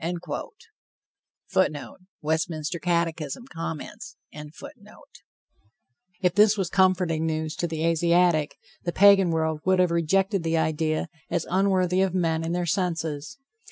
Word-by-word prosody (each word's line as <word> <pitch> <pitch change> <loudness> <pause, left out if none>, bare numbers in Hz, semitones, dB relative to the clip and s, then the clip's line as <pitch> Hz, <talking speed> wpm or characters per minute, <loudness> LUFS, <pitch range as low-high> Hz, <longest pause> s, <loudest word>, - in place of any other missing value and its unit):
[Footnote: 145 -1 0 0.3
Westminster 160 +1 -2
Catechism, 170 - -2
Comments.] 165 -2 -6 0.5
If 165 - -9
this 210 +2 +5
was 190 -3 -2
comforting 180 -4 +2
news 155 0 -2
to 175 - -1
the 160 0 -3
Asiatic, 170 -1 +2 0.3
the 175 - -2
Pagan 200 -2 +6
world 160 -1 -1
would 185 0 +3
have 180 -2 +3
rejected 190 +4 +1
the 165 0 0
idea 155 +1 0 0.2
as 170 - -1
unworthy 185 -1 +2
of 190 -1 0
men 165 -3 0
in 165 - -3
their 175 0 -1
senses. 165 - -2
170 Hz, 120 wpm, -25 LUFS, 160-185 Hz, 0.5 s, Pagan